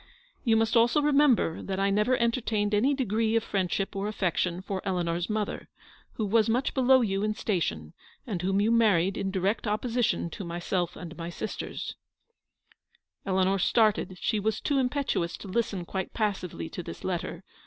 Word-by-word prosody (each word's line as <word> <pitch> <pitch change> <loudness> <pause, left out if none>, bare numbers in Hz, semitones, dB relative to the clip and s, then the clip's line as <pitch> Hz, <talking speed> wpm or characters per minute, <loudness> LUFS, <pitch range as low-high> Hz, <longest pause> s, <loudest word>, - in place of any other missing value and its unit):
" - - -36
You 225 -3 +3
must 225 +2 +1
also 235 +5 +5
remember 285 - +3
that 190 -1 -3
I 195 0 +2
never 210 +5 +3
enter 235 +2 +1
30 225 - -3
tained 205 0 +1
any 255 +8 +3
degree 225 -3 0
of 225 - +2
friendship 195 -1 -1
or 195 +1 -2
affection 185 -3 -1
for 190 -1 -3
Eleanor's 175 -2 -1
mother, 215 -1 -3 0.4
who 220 - -2
was 220 +2 +3
much 250 +5 +1
below 260 0 +5
you 195 -4 0
in 215 0 0
station, 80 - -2 0.3
and 195 -8 -3
whom 195 +2 +1
you 215 +3 +2
married 200 -5 +3
in 195 - -2
direct 190 +4 0
opposi 225 +3 0
tion 170 -6 0
to 195 - -6
myself 175 0 -2
and 170 -1 -8
my 170 0 -5
sisters 175 - -5 0.4
— - - -37
" - - -43
Eleanor 190 0 +2
started; 210 -2 +2
she 215 - 0
was 215 +1 0
too 285 -2 +1
impetuous 255 -9 -1
to - - -10
listen 195 -3 -1
quite 190 +1 -4
passively 190 - -2
to - - -6
this - - -9
letter. - - -3
205 Hz, 185 wpm, -28 LUFS, 185-230 Hz, 0.4 s, also